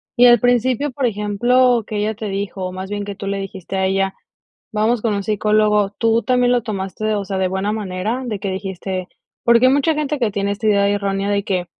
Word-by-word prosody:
y 245 +1 +7
al 240 -1 +7
principio, 245 +4 +1
por 255 0 0
ejemplo, 235 +3 +2
que 215 - -5
ella 210 +1 0
te 215 0 -6
dijo, 195 -1 -4
o 185 - -4
más 190 +2 -7
bien 205 0 -2
que 200 0 -6
tú 200 - -7
le 200 0 -2
dijiste 195 -1 -6
a 190 - +1
ella: 195 0 0 0.6
"Vamos 215 +2 +1
con 215 -2 0
un 200 - -2
psicólogo", 210 0 +2
¿tú 230 0 +2
también 250 -1 +2
lo 245 -1 +3
tomaste, 215 +1 -3
o 200 -1 -2
sea, 190 -1 -3
de 190 - +2
buena 190 +2 -1
manera, 210 +3 -3
de 215 -5 -3
qué 200 0 -3
dijiste 190 -1 -4 0.4
porque 235 +1 +5
hay 260 - +4
mucha 285 +3 +2
gente 300 -1 -2
que 235 -4 +1
tiene 200 0 -1
esta 205 +2 -2
idea 200 -1 +3
errónea 200 -1 -1
de 200 0 0
que, 185 -3 -1
205 Hz, 230 wpm, -19 LUFS, 195-235 Hz, 0.6 s, y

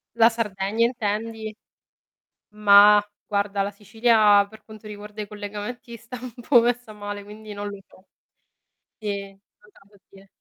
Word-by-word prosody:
La 230 0 +6
Sardegna 220 0 -1
intendi? 220 -1 -3 1.0
Mah, 205 0 +7 0.2
guarda 200 -1 0
la 200 - -2
Sicilia 210 -1 +3
per 220 +1 -16
quanto 215 -1 -13
riguarda 210 0 -9
i - - -7
collegamenti 210 +3 -7
sta 235 +2 -10
un 255 -1 -8 0.2
po' 245 -4 +7
messa 240 -1 -1
male, 205 -1 -7
quindi 210 +1 -11
non 205 0 -5
lo 200 - -8
so. 185 - -22 0.9
Sì, 200 -2 -4
non 195 - -23 0.3
te - - -23
lo 205 - -23
so - - -53
dire. 195 0 -17
210 Hz, 155 wpm, -24 LUFS, 205-225 Hz, 1.0 s, Mah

